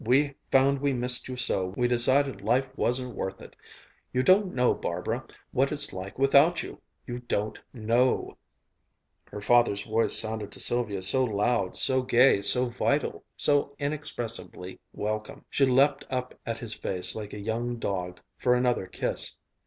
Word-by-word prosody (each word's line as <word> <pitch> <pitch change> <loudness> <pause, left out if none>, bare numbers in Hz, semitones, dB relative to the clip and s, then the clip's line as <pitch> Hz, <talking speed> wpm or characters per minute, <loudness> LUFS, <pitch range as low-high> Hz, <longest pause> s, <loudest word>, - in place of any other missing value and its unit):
We 140 +5 +2 0.2
found 135 +1 +3
we 140 -1 +1
missed 125 0 0
you 130 -1 -6
so, 95 -6 +1
we 125 - +2
decided 130 +3 +3
life 130 +2 +1
wasn't 125 -1 -1
worth 95 0 -4
it. - - -13 0.6
You 130 - 0
don't 190 +4 +4
know, 125 -1 +3
Barbara, 110 +9 -3 0.3
what 135 +1 +1
it's 150 -1 -3
like 95 +1 -7
without 140 +5 +4
you - - -10 0.2
you 120 -1 -5
don't 110 -3 -3
know!" 120 +2 0 0.9
Her 105 - -9
father's 105 -3 +3
voice 115 0 +1
sounded 110 -2 -2
to - - -8
Sylvia 110 -6 -1
so 130 +8 +2
loud, 105 -3 0
so 130 0 +4
gay, 125 -3 +4
so 125 +5 +5
vital, 135 +4 -1
so 145 -1 +2
inexpressibly 120 -10 -4
welcome.... 110 +1 -5
She 135 - +3
leaped 135 +2 +3
up 125 -1 -3
at 115 0 -2
his 115 -2 -5
face 90 -3 -2
like 105 -2 -7
a 105 - -6
young 115 +3 -3
dog, 90 -5 -4 0.2
for 125 0 +3
another 125 -6 0
kiss. - - -3
120 Hz, 160 wpm, -27 LUFS, 110-130 Hz, 0.9 s, so